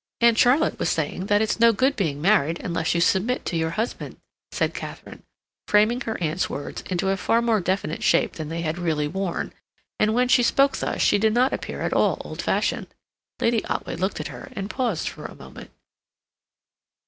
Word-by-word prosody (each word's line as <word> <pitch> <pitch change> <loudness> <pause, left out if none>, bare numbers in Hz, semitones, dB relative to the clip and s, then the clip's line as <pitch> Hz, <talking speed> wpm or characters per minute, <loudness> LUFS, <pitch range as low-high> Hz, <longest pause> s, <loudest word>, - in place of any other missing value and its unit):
"Aunt 235 -1 +5
Charlotte 260 +7 +3
was - - 0
saying 185 - -2
that 205 +1 +3
it's 220 - -1
no 230 0 +7
good 260 +6 +1
being 155 -8 -1
married 170 -5 +3
unless 165 -1 -1
you 170 - +2
submit 210 +8 +1
to 175 - -2
your 160 0 0
husband," 225 +3 -3 0.3
said - - 0
Katharine, - - -8 0.5
framing 215 +4 +3
her 225 -3 -3
aunt's 165 +1 -1
words 145 - -5
into 185 +1 0
a 195 - +1
far 230 +4 +2
more 230 -3 +2
definite 185 -3 -2
shape - - +2
than 155 -2 -6
they 165 +1 -3
had 165 +1 -2
really 155 -4 0
worn; 190 +2 -3 0.5
and 215 +1 +2
when 250 +1 +3
she 250 - +5
spoke 275 +3 +3
thus - - -1
she 205 - +4
did 220 +1 +2
not 255 +2 +3
appear - - -5
at - - -1
all - - +2
old - - -6
fashioned. - - 0 0.5
Lady 230 -1 +1
Otway - - -3
looked 190 0 -2
at 155 - -4
her 125 -3 -9
and 195 +2 -4
paused 240 - -1
for - - -7
a - - -8
moment. - - -12
200 Hz, 195 wpm, -24 LUFS, 170-235 Hz, 0.5 s, no